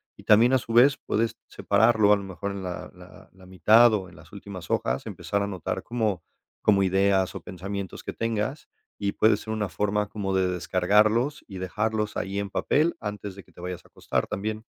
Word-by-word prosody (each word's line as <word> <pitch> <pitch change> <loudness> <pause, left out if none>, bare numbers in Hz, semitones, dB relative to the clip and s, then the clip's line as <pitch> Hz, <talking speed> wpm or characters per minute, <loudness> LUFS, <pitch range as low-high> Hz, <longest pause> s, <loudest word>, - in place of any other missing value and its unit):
y - - -15
también 115 +4 +5
a 130 - +5
su 115 - -8
vez, 130 +4 +6
puedes 115 +2 0
separarlo 110 0 +3
a - - +6
lo 100 - -4
mejor 95 +1 -5
en 100 -1 -6
la 90 -1 -6
la - - -15
la 95 -1 -17
mitad 110 +7 +5
o 95 -2 -4
en - - -17
las 75 0 -16
últimas 100 -4 -9
hojas, - - -1
empezar 100 - -2
a 100 - 0
anotar 95 -4 -4
como 110 -7 -1 0.4
como 100 -2 +4
ideas 95 0 +2
o - - -6
pensamientos 100 +1 -6
que - - -5
tengas 115 +5 -3 0.3
y 100 -1 0
puede 110 -1 +4
ser 110 - -7
una 105 -2 -1
forma 105 +5 -1
como 100 -2 -3
de 95 -1 +2
descargarlos 105 - +2
y 95 - -8
dejarlos 105 +4 -2
ahí 100 +1 -3
en 100 -1 -4
papel 155 +10 +1
antes 105 -2 -5
de 100 - -11
que - - -24
te - - -18
vayas 90 0 -6
a - - -20
acostar - - -2
también, 110 +2 -4
100 Hz, 205 wpm, -26 LUFS, 95-110 Hz, 0.4 s, vez